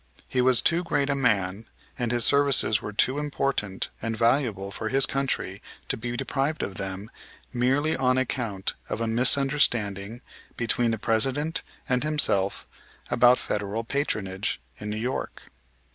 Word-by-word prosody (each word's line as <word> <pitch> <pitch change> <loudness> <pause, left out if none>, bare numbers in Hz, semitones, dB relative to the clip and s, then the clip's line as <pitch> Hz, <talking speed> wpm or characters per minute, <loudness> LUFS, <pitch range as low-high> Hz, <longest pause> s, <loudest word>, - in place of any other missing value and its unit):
He 125 - 0
was 125 -1 +4
too 170 +1 +2
great 145 -4 0
a - - +1
man, 105 -5 0 0.3
and 120 -1 -1
his 120 -1 +4
services 140 -6 +3
were 105 - -5
too 130 +6 +1
important 135 -9 -2
and 115 0 -2
valuable 115 -5 +1
for - - -4
his 135 0 +3
country 130 -8 -2 0.3
to - - +3
be 120 0 -5
deprived 140 +5 -1
of 100 - -4
them 95 +2 -6 0.4
merely 135 +6 +1
on 130 -1 +2
account 115 -6 -1 0.2
of - - -3
a 115 - -1
misunderstanding 120 -3 +1 0.3
between 115 0 +1
the 115 - 0
President 135 +9 +1 0.3
and 125 +1 +1
himself 140 -11 +1 0.5
about 125 +1 +5
Federal 105 +2 -3
patronage 105 -7 -2 0.2
in 105 - -5
New 105 - -3
York. 125 +4 -4
120 Hz, 145 wpm, -26 LUFS, 105-135 Hz, 0.5 s, about